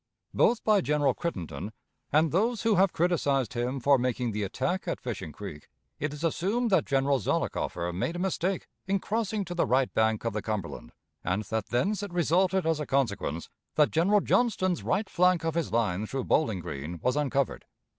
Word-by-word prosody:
Both 235 Hz, -, +3 dB
by 210 Hz, -2 st, +4 dB
General 145 Hz, -4 st, +2 dB
Crittenden 95 Hz, -, -5 dB, 0.4 s
and 155 Hz, +1 st, +3 dB
those 225 Hz, +6 st, +1 dB
who 225 Hz, -1 st, +3 dB
have 195 Hz, -1 st, +4 dB
criticised 145 Hz, -, +1 dB
him 125 Hz, +2 st, -2 dB
for 140 Hz, +2 st, +4 dB
making 125 Hz, -1 st, -1 dB
the 105 Hz, 0 st, -3 dB
attack 135 Hz, -, -2 dB
at 170 Hz, -, -2 dB
Fishing 110 Hz, -10 st, -5 dB
Creek, 80 Hz, -3 st, -9 dB, 0.3 s
it 145 Hz, +1 st, -1 dB
is 150 Hz, +2 st, -8 dB
assumed 205 Hz, +8 st, 0 dB
that 185 Hz, -5 st, +4 dB
General 135 Hz, 0 st, +2 dB
Zollicoffer 90 Hz, -4 st, -1 dB
made 130 Hz, -, -2 dB
a -, -, -3 dB
mistake 190 Hz, 0 st, -1 dB, 0.2 s
in 195 Hz, +1 st, +2 dB
crossing 210 Hz, 0 st, -2 dB
to 175 Hz, -, -5 dB
the 175 Hz, -, +1 dB
right 130 Hz, +1 st, +2 dB
bank 110 Hz, 0 st, +1 dB
of 115 Hz, -, -1 dB
the 105 Hz, -, -2 dB
Cumberland, 105 Hz, -5 st, -4 dB, 0.3 s
and 95 Hz, +4 st, 0 dB
that 110 Hz, -1 st, -3 dB
thence 195 Hz, -, 0 dB
it 205 Hz, -2 st, -5 dB
resulted 180 Hz, +2 st, +2 dB
as 160 Hz, -1 st, +1 dB
a 150 Hz, -, -4 dB
consequence 100 Hz, -, -1 dB, 0.3 s
that 150 Hz, -1 st, +4 dB
General 195 Hz, +6 st, +3 dB
Johnston's 185 Hz, -8 st, +1 dB
right 205 Hz, +1 st, 0 dB
flank 180 Hz, -2 st, +2 dB
of 165 Hz, -, 0 dB
his 165 Hz, -3 st, -1 dB
line 110 Hz, -3 st, 0 dB
through 135 Hz, +2 st, -3 dB
Bowling 110 Hz, -, +1 dB
Green 75 Hz, +3 st, -6 dB
was 125 Hz, +2 st, +2 dB
uncovered. 140 Hz, -2 st, 0 dB
145 Hz, 185 wpm, -28 LUFS, 115-185 Hz, 0.4 s, by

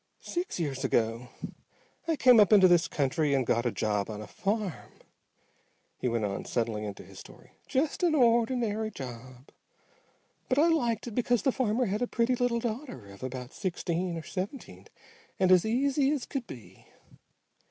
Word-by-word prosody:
"Six 350 Hz, -, -3 dB
years 140 Hz, -5 st, -2 dB
ago 115 Hz, +2 st, 0 dB, 0.8 s
I 325 Hz, -, +2 dB
came 250 Hz, -5 st, +6 dB
up 210 Hz, -, +5 dB
into 195 Hz, -3 st, +8 dB
this 175 Hz, -1 st, +4 dB
country 140 Hz, +1 st, 0 dB
and 130 Hz, -2 st, +1 dB
got 120 Hz, +1 st, +1 dB
a -, -, 0 dB
job 105 Hz, -2 st, -1 dB
on 105 Hz, -1 st, -5 dB
a 105 Hz, -, -7 dB
farm," 200 Hz, -, -4 dB, 1.0 s
he -, -, -3 dB
went 115 Hz, -3 st, 0 dB
on, 100 Hz, -1 st, -3 dB
settling 115 Hz, -3 st, -2 dB
into 100 Hz, -2 st, -7 dB
his -, -, -13 dB
story. -, -, -15 dB, 0.2 s
"Just 285 Hz, +6 st, 0 dB
an 340 Hz, -3 st, +3 dB
ordinary 230 Hz, -3 st, +2 dB
job. 130 Hz, -, -10 dB, 1.0 s
But 255 Hz, -, +1 dB
I 320 Hz, +4 st, +5 dB
liked 240 Hz, -9 st, +1 dB
it 240 Hz, -, -6 dB
because 245 Hz, -1 st, +1 dB
the 265 Hz, -, +3 dB
farmer 250 Hz, -1 st, 0 dB
had 210 Hz, +2 st, -2 dB
a 245 Hz, -, +1 dB
pretty 240 Hz, +2 st, +1 dB
little 245 Hz, -1 st, 0 dB
daughter 235 Hz, -, -5 dB
of 100 Hz, -, -15 dB
about 130 Hz, 0 st, -6 dB
sixteen 175 Hz, -2 st, -2 dB
or 165 Hz, -, -6 dB
seventeen 200 Hz, -, -6 dB, 0.5 s
and 185 Hz, -1 st, +3 dB
as 185 Hz, +3 st, +5 dB
easy 270 Hz, +4 st, +2 dB
as 290 Hz, -4 st, -1 dB
could 265 Hz, -4 st, -5 dB
be. 120 Hz, -4 st, -12 dB
200 Hz, 170 wpm, -29 LUFS, -, 1.0 s, into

